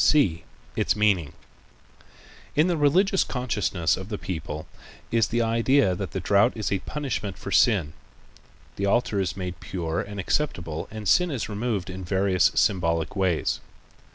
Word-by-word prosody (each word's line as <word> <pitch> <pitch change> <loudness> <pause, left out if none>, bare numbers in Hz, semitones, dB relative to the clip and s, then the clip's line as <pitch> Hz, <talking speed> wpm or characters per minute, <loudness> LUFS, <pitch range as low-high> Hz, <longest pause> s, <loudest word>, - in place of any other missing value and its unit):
(c) 90 - +3 0.3
Its - - +1
Meaning.—In 105 - -3
the 180 -1 +1
religious 180 +6 +3
consciousness 105 - 0
of 95 +2 -8
the 105 - -3
people 80 -5 -5 0.5
is 115 -2 +3
the 120 0 0
idea 115 -2 +3
that 90 - -4
the - - -4
drought 100 +5 +3
is 110 -4 -3
a 100 - +1
punishment 125 -9 -4
for - - -7
sin. 90 -11 +3 0.8
The 100 - 0
altar 105 0 +1
is 95 0 -2
made 90 -3 -5
pure 85 -3 -3
and 100 0 -7
acceptable 85 - -2
and 110 -2 -6
sin 180 - +4
is 130 -8 -3
removed 105 -3 -2
in 95 +1 -7
various 95 0 +2
symbolic 85 -5 +1
ways. 95 -5 0
100 Hz, 150 wpm, -25 LUFS, 90-120 Hz, 0.8 s, sin